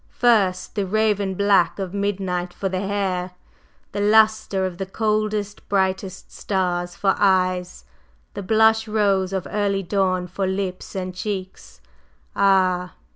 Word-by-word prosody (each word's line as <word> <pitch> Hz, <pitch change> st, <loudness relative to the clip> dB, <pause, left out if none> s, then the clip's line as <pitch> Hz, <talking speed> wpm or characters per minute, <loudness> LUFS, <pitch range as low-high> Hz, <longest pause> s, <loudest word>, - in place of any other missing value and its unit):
First, 205 Hz, -7 st, +2 dB
the 200 Hz, -3 st, -2 dB
raven 205 Hz, -1 st, +1 dB
black 200 Hz, -3 st, +3 dB
of 190 Hz, -2 st, -5 dB
midnight 190 Hz, -3 st, -2 dB
for 195 Hz, -, -2 dB
the 185 Hz, -1 st, -2 dB
hair, 190 Hz, -2 st, -2 dB, 0.6 s
the -, -, -4 dB
lustre 215 Hz, -2 st, +3 dB
of 180 Hz, -2 st, -5 dB
the 195 Hz, -, -3 dB
coldest, 215 Hz, 0 st, -2 dB
brightest 190 Hz, -1 st, -1 dB
stars 175 Hz, -2 st, -2 dB
for 195 Hz, -1 st, +2 dB
eyes, 185 Hz, -, +1 dB, 0.5 s
the -, -, -5 dB
blush 220 Hz, +2 st, +3 dB
rose 200 Hz, -3 st, +1 dB
of 190 Hz, -2 st, -2 dB
early 200 Hz, -1 st, 0 dB
dawn 185 Hz, -1 st, 0 dB
for 185 Hz, +2 st, -3 dB
lips 190 Hz, 0 st, -4 dB
and 185 Hz, -1 st, -4 dB
cheeks. 190 Hz, 0 st, -6 dB, 0.5 s
Ah! 185 Hz, -2 st, +2 dB
195 Hz, 130 wpm, -22 LUFS, 185-205 Hz, 0.6 s, black